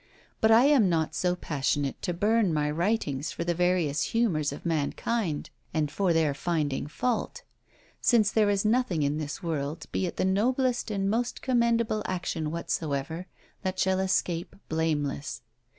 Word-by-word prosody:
But 220 - +4
I 225 +2 +7
am 270 -9 +5
not 160 -2 0
so 180 -1 +1
passionate 145 -4 -1
to - - -1
burn 205 +2 +2
my 150 -1 0
writings 160 -5 -1
for - - -4
the 175 0 0
various 175 -4 +1 0.2
humours 155 -12 +2
of 145 - -9
mankind, 165 +3 -1 0.2
and 150 -2 0
for 190 +2 +1
their 160 -3 +2
finding 150 -2 -1
fault; 235 +11 -2 0.6
since 220 -5 +4
there 215 -2 +3
is 200 0 +1
nothing 215 -8 +2
in 145 +2 0
this 145 +1 -5
world, 155 -2 -3
be 185 - 0
it - - -6
the - - +1
noblest 245 +6 +1
and 195 -2 -1
most 235 +4 -1
commendable 235 -3 +2
action 175 -4 -2
whatsoever, 160 +1 -3 0.3
that 185 -2 -2
shall 190 0 +2
escape 180 -2 -1
blameless. 155 -4 -1
175 Hz, 155 wpm, -28 LUFS, 155-215 Hz, 0.6 s, I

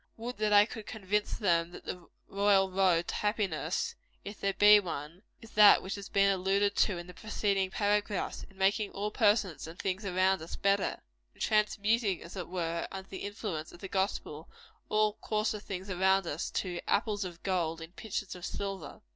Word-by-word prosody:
Would 240 +2 -6
that 215 0 0
I 205 0 +7
could 220 -1 -9
convince 210 0 -1
them 170 -5 +2
that - - -11
the 180 -2 -6 0.2
royal 195 -1 +3
road 185 -3 +2
to - - -2
happiness 195 -6 -1 0.3
if 205 +1 -7
there 195 0 0
be 210 0 +8
one 165 -2 -6 0.2
is 225 - -13
that 210 -1 +7
which 190 - -4
has 200 -1 -7
been 195 0 +4
alluded 195 +2 +1
to 195 - +3
in 175 - -6
the 180 - -11
preceding 200 -1 -1
paragraphs; 205 0 -1
in 195 - -21
making 200 +2 +2
all 210 +1 -3
persons 205 - +2
and 165 +2 -10
things 190 +2 -2
around 190 -1 +2
us 160 - -7
better 200 0 0 0.3
in - - -16
transmuting, 210 -1 +1
as 170 - -11
it 185 - -5
were, 170 -2 -2
under 190 0 -7
the 190 - -6
influence 200 -6 -5
of 175 - -14
the 195 - -6
gospel, 190 -5 -2 0.4
all 215 0 +1
coarser 215 0 -1
things 195 -2 -6
around 190 0 +2
us 160 0 -3
to 175 -2 -3
"apples 205 -1 +1
of 175 -2 -8
gold 170 -4 -1
in 165 +1 -9
pictures 205 0 -5
of 180 - -11
silver." 195 0 -5
195 Hz, 190 wpm, -31 LUFS, 180-205 Hz, 0.4 s, be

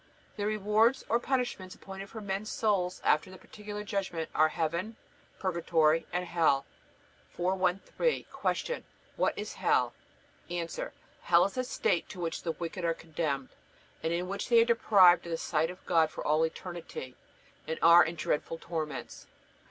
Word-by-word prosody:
The 205 -1 -2
rewards 215 +4 +2
or 235 - +3
punishments 240 -8 -2
appointed 195 0 -9
for 220 - -8
men's 200 +1 -3
souls 190 -4 0
after 155 +4 +2
the 185 - -11
Particular 210 +2 -8
Judgment 190 -5 -3
are 155 0 +4
Heaven, 170 +7 -2 0.4
Purgatory, 165 -3 +2
and 180 0 -1
Hell. 160 -6 +2 0.7
413. 185 - 0 0.4
Q. 485 - -4 0.3
What - - +1
is - - -5
Hell? - - +2 0.6
A. 175 -1 -2 0.5
Hell 170 0 +5
is 195 - -4
a 255 - 0
state 175 -8 0
to 185 - -9
which 165 -2 -3
the 165 - -2
wicked 170 +2 -5
are 165 -1 +1
condemned, 155 -5 -3 0.5
and 160 - -1
in 175 +2 -1
which 200 +4 -4
they 235 -1 +7
are 230 - +6
deprived 200 -7 +5
of - - -6
the 165 - -1
sight 160 0 0
of 180 +1 -11
God 160 -2 +3
for - - -7
all 155 +2 +3
eternity, 165 -7 -8 0.5
and 160 - -2
are 170 +1 +9
in 165 +2 -3
dreadful 165 0 -2
torments. 155 -6 -5
175 Hz, 160 wpm, -30 LUFS, 165-200 Hz, 0.7 s, are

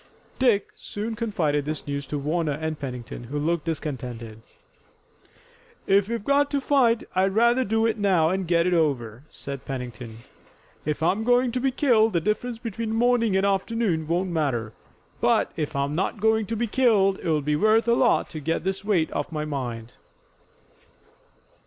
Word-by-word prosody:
Dick 235 -6 +2
soon 220 +2 -5
confided 180 -11 0
this 155 +1 -4
news 140 -1 -4
to 150 - -3
Warner 155 +2 -1
and 155 +1 -4
Pennington, 125 -3 -6
who 140 +5 -5
looked 160 +2 -1
discontented. 125 -8 -5 1.4
"If 200 +1 +3
we've 235 -3 -3
got 280 0 +3
to 285 - 0
fight, 255 -4 +2
I'd 190 +1 +1
rather 235 +3 +4
do 225 0 +1
it 225 -1 0
now 185 -6 +3
and 190 0 -1
get 170 0 +3
it 180 - +1
over," 135 -7 0
said 140 -1 -7
Pennington. 120 -4 -6 0.7
"If 150 +1 -2
I'm 195 +6 +1
going 245 +1 +3
to 250 - -1
be 270 +2 +1
killed 240 -5 +3
the 170 - +3
difference 220 +6 -2
between 225 -1 -4
morning 230 -3 +2
and 190 - +2
afternoon 195 -4 0
won't 175 +3 0
matter, 125 -9 -1 0.5
but - - +2
if 155 -1 -3
I'm 140 +1 -1
not 190 +6 -1
going 220 0 +2
to 225 - -2
be 235 +2 0
killed 210 -5 +3
it'll 155 -3 0
be 150 +1 +1
worth 215 +6 +3
a 235 - +4
lot 245 0 +3
to 155 - -6
get 165 +3 -2
this 190 +1 -2
weight 190 -6 +1
off - - -3
my 155 -1 -3
mind." 120 -6 -5
180 Hz, 170 wpm, -25 LUFS, 150-225 Hz, 1.4 s, rather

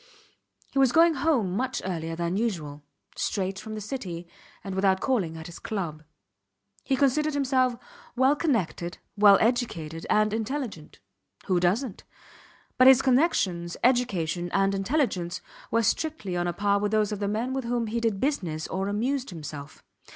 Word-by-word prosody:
He 275 - 0
was 265 -2 +5
going 330 +2 +5
home 265 - +1
much 260 +3 -1
earlier 165 -3 -3
than 170 +2 -2
usual, 170 -10 -2 0.3
straight 195 -1 -2
from 215 0 -7
the - - -4
City 190 -7 -5 0.4
and 195 - -5
without 190 0 +2
calling 190 -12 0
at 160 - -8
his 170 0 -9
club. 170 -8 -4 0.8
He 270 - +1
considered 290 +3 +2
himself 260 -3 +2 0.4
well 260 +3 +4
connected, 220 - -1 0.2
well 205 -1 +7
educated 170 -10 -1
and 215 0 +3
intelligent. 225 - -4 0.5
Who 185 -2 +2
doesnt? 195 +6 0 0.8
But 255 - +8
his 265 -2 +7
connections, 210 - +1
education 185 -9 +1
and 195 0 +2
intelligence 195 - -1 0.3
were 230 +1 +2
strictly 215 - -1
on 175 0 0
a 175 - -1
par 200 +1 +1
with 205 0 -1
those 215 -1 +2
of 210 - -3
the 200 - -1
men 225 +5 -1
with 265 -2 -3
whom 240 0 0
he 225 +2 -2
did 225 -4 0
business 180 - -1
or 190 +1 -2
amused 250 +6 -1
himself. 150 -5 -8
210 Hz, 160 wpm, -27 LUFS, 175-255 Hz, 0.8 s, But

